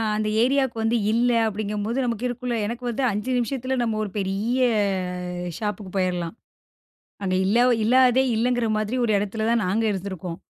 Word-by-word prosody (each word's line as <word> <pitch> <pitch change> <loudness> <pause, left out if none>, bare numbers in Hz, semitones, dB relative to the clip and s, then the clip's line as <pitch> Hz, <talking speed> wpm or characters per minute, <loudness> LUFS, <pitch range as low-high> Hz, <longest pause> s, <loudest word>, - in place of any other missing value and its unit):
அந்த 215 0 -1
ஏரியாவுக்கு 265 -1 +2
வந்து 225 +2 +2
இல்ல, 240 +2 +2 0.2
அப்படிங்கும்போது, 210 +2 -3
நமக்கு 235 0 -2
இருக்கும்ல்ல 245 -1 -3
எனக்கு 235 +3 -5
வந்து 250 +3 -2
5 210 +6 -3
நிமிஷத்துல, 260 +2 -1
நம்ம 225 -2 0
ஒரு 200 - -5
பெரிய, 200 +6 -1 1.0
ஷாப்புக்கு 205 -3 -4
போயிரலாம். 180 0 -1 0.9
அங்க 185 -1 0
இல்லா 235 +5 +4 0.2
இல்லாததே, 255 +2 +5
இல்லைங்கிற 240 0 +1
மாதிரி 215 +4 -1
ஒரு 220 - +1
எடத்துல 215 +2 -2
தான், 235 -2 +2
நாங்க 220 +5 +1
இருந்திருக்கோம். 185 -3 -5
225 Hz, 150 wpm, -24 LUFS, 205-245 Hz, 1.0 s, இல்லாததே